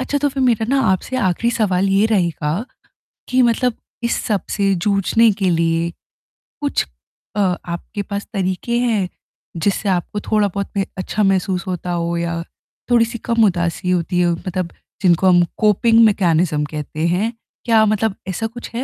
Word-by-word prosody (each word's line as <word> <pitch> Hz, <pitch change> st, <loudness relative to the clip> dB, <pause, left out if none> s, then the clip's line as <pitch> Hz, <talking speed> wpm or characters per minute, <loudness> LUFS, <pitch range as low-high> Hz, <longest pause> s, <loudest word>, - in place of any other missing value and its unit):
अच्छा, 285 Hz, +2 st, -1 dB
तो 290 Hz, +1 st, +1 dB
फिर 270 Hz, -1 st, -2 dB
मेरा 230 Hz, -3 st, +2 dB
ना 275 Hz, -, +3 dB
आपसे 225 Hz, +7 st, -2 dB
आख़िरी 200 Hz, +2 st, +1 dB
सवाल 195 Hz, -4 st, +1 dB
ये 195 Hz, +2 st, +3 dB
रहेगा 175 Hz, -2 st, 0 dB, 0.7 s
कि 255 Hz, +1 st, +3 dB
मतलब 240 Hz, 0 st, +2 dB, 0.3 s
इस 235 Hz, -, 0 dB
सब 210 Hz, -3 st, 0 dB
से 200 Hz, -1 st, +2 dB
जूझने 200 Hz, +5 st, +3 dB
के 190 Hz, -, +3 dB
लिए, 165 Hz, 0 st, +1 dB, 0.7 s
कुछ -, -, 0 dB, 0.5 s
अ, -, -, -1 dB, 0.3 s
आपके 175 Hz, +4 st, -5 dB
पास 200 Hz, 0 st, -5 dB
तरीके 190 Hz, +4 st, -1 dB
हैं? 220 Hz, -7 st, +1 dB, 0.5 s
जिससे 200 Hz, +4 st, 0 dB
आपको 185 Hz, +3 st, -1 dB
थोड़ा-बहुत 200 Hz, -2 st, 0 dB
मे 195 Hz, -, +1 dB
अच्छा 210 Hz, +3 st, -1 dB
महसूस 190 Hz, -2 st, +1 dB
होता 180 Hz, -1 st, -3 dB
हो 170 Hz, 0 st, -1 dB
या, 170 Hz, 0 st, -2 dB, 0.5 s
थोड़ी-सी 235 Hz, 0 st, +3 dB
कम 230 Hz, -2 st, +3 dB
उदासी 175 Hz, -1 st, 0 dB
होती 180 Hz, 0 st, +1 dB
हो, 175 Hz, -1 st, +3 dB, 0.2 s
मतलब 180 Hz, -1 st, -2 dB, 0.3 s
जिनको 185 Hz, 0 st, +4 dB
हम 175 Hz, -1 st, +5 dB
कोपिंग 225 Hz, +2 st, +4 dB
मैकेनिज्म 170 Hz, -6 st, +2 dB
कहते 155 Hz, +2 st, -3 dB
हैं। 200 Hz, +7 st, 0 dB, 0.3 s
क्या 225 Hz, -2 st, +5 dB
मतलब 215 Hz, -1 st, +1 dB
ऐसा 205 Hz, +4 st, -2 dB
कुछ 240 Hz, +2 st, -9 dB
है 250 Hz, -, -1 dB
195 Hz, 160 wpm, -19 LUFS, 175-225 Hz, 0.7 s, हम